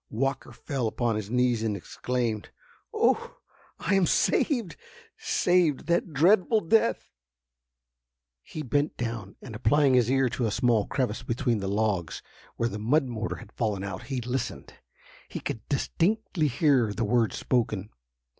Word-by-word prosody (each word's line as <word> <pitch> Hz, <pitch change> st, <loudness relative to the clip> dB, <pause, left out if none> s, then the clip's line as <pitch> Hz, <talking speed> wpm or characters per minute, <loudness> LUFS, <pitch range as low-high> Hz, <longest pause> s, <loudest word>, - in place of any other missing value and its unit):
Walker 135 Hz, +3 st, -2 dB
fell 135 Hz, -6 st, -3 dB
upon 115 Hz, 0 st, -1 dB
his 105 Hz, -1 st, -4 dB
knees 125 Hz, -1 st, +2 dB
and 110 Hz, -2 st, -1 dB
exclaimed: 115 Hz, +2 st, -3 dB, 0.4 s
"Oh! -, -, +1 dB, 0.4 s
I 190 Hz, -, -1 dB
am 195 Hz, -3 st, +4 dB
saved—saved 180 Hz, -, 0 dB
that 170 Hz, +1 st, 0 dB
dreadful 185 Hz, +8 st, +4 dB
death!" 220 Hz, +6 st, +1 dB, 1.3 s
He 155 Hz, -, -7 dB
bent 145 Hz, +3 st, 0 dB
down, 115 Hz, -4 st, -4 dB
and 120 Hz, -, -8 dB
applying 140 Hz, +5 st, +3 dB
his 125 Hz, -2 st, +4 dB
ear 135 Hz, 0 st, +3 dB
to 120 Hz, 0 st, -1 dB
a -, -, 0 dB
small 120 Hz, -3 st, +2 dB
crevice 125 Hz, -5 st, -1 dB
between 120 Hz, -1 st, -1 dB
the 95 Hz, -, -3 dB
logs, 100 Hz, -4 st, -1 dB, 0.3 s
where 115 Hz, -, 0 dB
the 105 Hz, -, -5 dB
mud 135 Hz, +8 st, +2 dB
mortar 115 Hz, -3 st, -4 dB
had -, -, -12 dB
fallen 105 Hz, -5 st, -2 dB
out, 100 Hz, +4 st, -6 dB
he 135 Hz, -2 st, -2 dB
listened. 120 Hz, -, -4 dB, 0.6 s
He -, -, -5 dB
could 115 Hz, -, -4 dB
distinctly 180 Hz, +3 st, 0 dB
hear 135 Hz, -4 st, +2 dB
the 115 Hz, +2 st, -1 dB
words 115 Hz, -2 st, +1 dB
spoken. 110 Hz, -5 st, -1 dB
125 Hz, 145 wpm, -27 LUFS, 110-145 Hz, 1.3 s, am